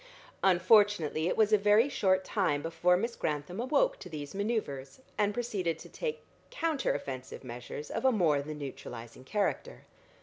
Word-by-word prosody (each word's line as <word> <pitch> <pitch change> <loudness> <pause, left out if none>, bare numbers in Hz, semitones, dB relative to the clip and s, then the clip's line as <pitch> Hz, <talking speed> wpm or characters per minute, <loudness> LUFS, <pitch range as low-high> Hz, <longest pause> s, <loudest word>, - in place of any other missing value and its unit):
Unfortunately 185 -4 +4
it - - 0
was 215 -1 +4
a 210 - +6
very 210 +5 +5
short 190 -8 +1
time 165 -10 0
before 170 +2 +2
Miss 235 +5 -2
Grantham 150 +6 -3
awoke - - +2
to - - -9
these 145 -3 -6
manoeuvres, 200 - -3 0.2
and 205 -1 +2
proceeded 205 -7 -2
to - - -12
take 470 -2 -4 0.3
counter 330 - 0
offensive 130 -1 -6
measures 125 +4 -7
of - - -3
a 260 - +5
more 165 - +2
than 150 +1 -6
neutralising 125 -4 -8
character. 210 - -2
185 Hz, 160 wpm, -31 LUFS, 150-220 Hz, 0.3 s, a